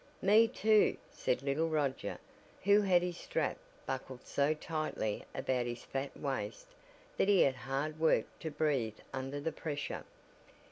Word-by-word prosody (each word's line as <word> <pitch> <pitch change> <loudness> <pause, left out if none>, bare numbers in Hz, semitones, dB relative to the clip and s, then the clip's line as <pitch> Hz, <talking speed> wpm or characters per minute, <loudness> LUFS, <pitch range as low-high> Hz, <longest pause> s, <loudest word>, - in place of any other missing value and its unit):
"Me 215 +4 +6
too," 220 -3 +4
said 125 - -1
little 145 +4 +1
Roger, 145 -4 -1 0.5
who 205 +2 +6
had 180 -3 +4
his 180 -1 -3
strap - - -1 0.3
buckled 130 -1 -5
so 140 +1 +2
tightly 155 -9 -2
about 125 -2 0
his 120 0 -5
fat 135 +1 -4
waist, 115 -7 -3 0.5
that - - +3
he 200 -2 +6
had 135 - +5
hard 135 +4 -3
work 160 0 +4
to 160 - -3
breathe 140 -8 0 0.2
under 135 +2 -3
the 160 +3 -2
pressure. 145 -2 -4
145 Hz, 145 wpm, -34 LUFS, 130-165 Hz, 0.5 s, Me